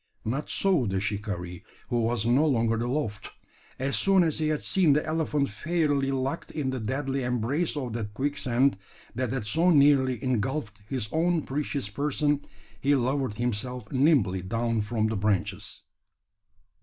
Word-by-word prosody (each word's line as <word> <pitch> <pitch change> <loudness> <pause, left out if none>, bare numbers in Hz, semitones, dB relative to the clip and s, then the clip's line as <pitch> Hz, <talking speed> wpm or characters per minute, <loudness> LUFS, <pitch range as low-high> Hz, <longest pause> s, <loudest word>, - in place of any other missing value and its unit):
Not 135 +7 -2
so 180 - +2
the 95 -1 0
shikaree, 95 -4 -4 0.3
who 120 -1 +1
was 115 -1 +1
no 125 +5 +4
longer 115 -5 +2
aloft. 120 -3 -2 0.5
As 135 +1 -1
soon 195 -2 +4
as 160 -2 0
he 155 - +1
had 155 -1 -1
seen 175 -7 +3
the 150 - +1
elephant 155 -4 0
fairly 145 +2 0
locked 135 +3 -2
in 145 -4 -2
the 130 - -3
deadly 135 +4 -2
embrace 125 +7 -1
of 125 -5 -3
that 105 -3 -4
quicksand 130 -3 +1 0.3
that 125 0 -2
had 130 -5 -2
so 165 - +2
nearly 140 -5 +5
engulfed 120 -2 -2
his 125 -6 -2
own 165 0 +1
precious 140 -3 -2
person, 145 +5 0 0.4
he 140 +1 +3
lowered 130 -2 0
himself 120 0 -3
nimbly 130 - +3
down 115 +4 -1
from 110 +1 -1
the 110 0 0
branches. 100 -2 -1
130 Hz, 155 wpm, -27 LUFS, 110-145 Hz, 0.5 s, nearly